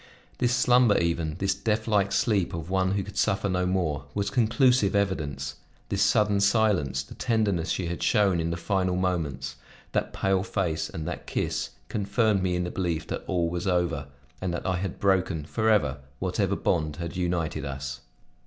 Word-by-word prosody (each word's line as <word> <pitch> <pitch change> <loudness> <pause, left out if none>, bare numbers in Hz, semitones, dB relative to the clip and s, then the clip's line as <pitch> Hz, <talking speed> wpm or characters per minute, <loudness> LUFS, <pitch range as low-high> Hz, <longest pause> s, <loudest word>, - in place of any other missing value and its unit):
This 125 0 +2
slumber 125 -3 +5
even, 85 -2 0
this 95 +1 +1
deathlike 105 -2 +1
sleep 100 -7 +1
of 85 +2 -6
one 95 0 +2
who 100 -1 0
could 100 +1 -10
suffer 95 +1 +1
no 90 -1 0
more, 80 -7 -1
was 100 0 -1
conclusive 120 -1 +3
evidence; 70 -9 -1 0.3
this - - 0
sudden 105 -1 +3
silence, 100 - +2
the - - -12
tenderness 105 -8 0
she 90 - -1
had 85 0 -4
shown 100 -5 +3
in 80 0 -1
the 85 - -2
final 95 0 0
moments, 80 -8 -2 0.3
that - - -1
pale 95 -1 +1
face, 90 -5 -1
and 80 0 -5
that 90 - -5
kiss, - - -1 0.2
confirmed 105 0 +1
me 90 -1 0
in 90 - 0
the 90 - -3
belief 85 -4 -2
that - - -3
all 85 -2 +1
was 85 +3 -3
over, 85 -6 0 0.3
and 95 - -1
that - - -5
I 95 -1 +1
had 95 -1 -4
broken, 95 -5 +1
forever, 80 -4 +1 0.2
whatever - - 0
bond 75 -3 0
had 85 0 -5
united 85 -4 -1
us. 70 -1 -5
90 Hz, 175 wpm, -27 LUFS, 85-100 Hz, 0.3 s, slumber